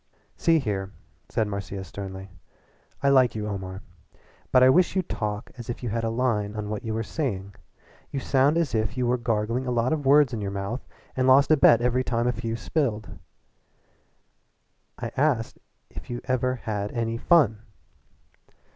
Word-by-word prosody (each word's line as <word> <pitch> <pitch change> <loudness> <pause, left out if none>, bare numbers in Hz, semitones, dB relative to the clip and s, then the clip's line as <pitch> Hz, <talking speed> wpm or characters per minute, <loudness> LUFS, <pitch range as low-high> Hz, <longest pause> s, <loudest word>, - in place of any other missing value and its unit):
"See 165 -2 +3
here," 100 -9 -2 0.4
said 110 - 0
Marcia 100 -1 -5
sternly, 95 0 -8 0.7
"I 140 - +4
like 130 -4 +4
you, 105 -1 -3
Omar, 95 -1 -5 0.7
but 130 - +6
I 130 - +7
wish 180 +6 +3
you'd 185 -3 -1
talk 105 0 -3
as 120 - -8
if 120 - -5
you 120 - -2
had 115 +2 -2
a 115 - 0
line 115 -3 -1
on 105 -1 -4
what 105 -1 -4
you 110 -1 -3
were 115 - -1
saying. 100 -8 -3 0.6
You 140 - -3
sound 135 +4 +2
as 165 -5 0
if 110 +2 -1
you 125 - +1
were 125 +1 +1
gargling 115 +2 -1
a - - 0
lot 120 +4 +1
of 145 -3 -2
words 140 -2 +5
in 110 - -3
your 100 - -2
mouth 100 +5 -4 0.3
and 130 0 +1
lost 135 +3 +6
a - - +8
bet 120 -5 +6
every 125 +1 +2
time 120 -2 -1 0.2
you 115 -1 -2
spilled 115 -2 -1
a - - -13
few. - - -12 1.8
I - - -5
asked 130 -5 +1 0.3
you - - -25
if - - -9
you 120 0 -3
ever 130 -1 0
had 105 -4 -4
any 115 -1 -1
fun." 135 - +4
115 Hz, 185 wpm, -25 LUFS, 105-130 Hz, 1.8 s, a